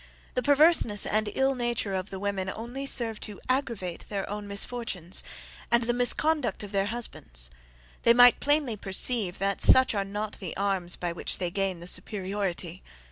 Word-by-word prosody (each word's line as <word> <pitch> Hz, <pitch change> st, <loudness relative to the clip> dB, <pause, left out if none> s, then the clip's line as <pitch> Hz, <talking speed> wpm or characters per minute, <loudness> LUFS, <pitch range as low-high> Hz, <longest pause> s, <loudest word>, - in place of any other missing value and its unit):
The 250 Hz, -, 0 dB
perverseness 285 Hz, -7 st, +4 dB
and 215 Hz, 0 st, +1 dB
ill 270 Hz, 0 st, +2 dB
nature 240 Hz, -5 st, -1 dB
of 190 Hz, +1 st, -3 dB
the 195 Hz, -, -6 dB
women 195 Hz, -1 st, -2 dB
only 245 Hz, +6 st, -6 dB
serve 225 Hz, -5 st, +1 dB
to 210 Hz, -2 st, -5 dB
aggravate 235 Hz, -10 st, -2 dB
their 200 Hz, -2 st, -3 dB
own 205 Hz, 0 st, -5 dB
misfortunes, 200 Hz, -4 st, -1 dB, 0.5 s
and 235 Hz, 0 st, +3 dB
the 240 Hz, +1 st, 0 dB
misconduct 245 Hz, -1 st, +1 dB
of 205 Hz, -, -8 dB
their 195 Hz, -1 st, 0 dB
husbands; -, -, -5 dB, 0.5 s
they 235 Hz, -, +5 dB
might 245 Hz, +1 st, +7 dB
plainly 290 Hz, -5 st, +1 dB
perceive 195 Hz, 0 st, 0 dB
that 195 Hz, +1 st, -1 dB
such 260 Hz, -2 st, +7 dB
are 200 Hz, -2 st, 0 dB
not 205 Hz, +2 st, -5 dB
the 180 Hz, -5 st, -6 dB
arms 195 Hz, -3 st, 0 dB
by 175 Hz, -1 st, -3 dB
which 170 Hz, -, -3 dB
they 180 Hz, -2 st, -3 dB
gain 190 Hz, -2 st, -2 dB
the -, -, -8 dB
superiority." 190 Hz, -3 st, -3 dB
205 Hz, 170 wpm, -27 LUFS, 190-240 Hz, 0.5 s, might